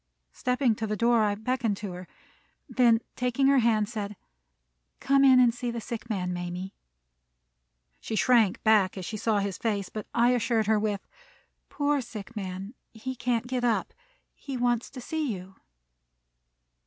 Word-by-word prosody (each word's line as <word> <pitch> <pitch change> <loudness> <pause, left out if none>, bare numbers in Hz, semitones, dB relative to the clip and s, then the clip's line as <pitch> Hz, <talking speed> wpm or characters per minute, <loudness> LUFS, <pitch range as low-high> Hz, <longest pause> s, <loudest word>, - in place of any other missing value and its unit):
Stepping 250 - +1
to 220 +1 -4
the 215 0 -2
door, 235 0 +3
I 205 -1 0
beckoned 225 -1 -1
to 205 -2 -5
her; 180 0 -8 0.6
then, 235 -3 +4
taking 250 +2 0
her 275 0 +5
hand, 220 -3 +2
said, 210 -2 -5 0.8
"Come 275 0 +3
in 260 -2 +7
and 245 -2 +5
see 245 0 -4
the 235 0 -3
sick 230 +1 -6
man, 180 -4 -2
Mamie." 175 +2 -5 1.3
She 220 - -4
shrank 220 0 +3
back 210 -4 +4
as 185 - -5
she 220 - -5
saw 215 0 +1
his 200 -1 -2
face, 205 -4 -1
but 215 - -6
I 240 +1 +3
assured 230 -2 +1
her 215 0 +3
with, 205 -2 -2 0.6
"Poor 290 -1 0
sick 230 -2 -9
man! 195 +1 -5 0.2
He 260 +4 -5
can't 240 -1 -1
get 250 0 -2
up; 235 -2 0 0.4
he 275 -2 -6
wants 240 -1 0
to 260 - -9
see 310 0 -2
you." 190 -1 -7
225 Hz, 165 wpm, -27 LUFS, 205-245 Hz, 1.3 s, in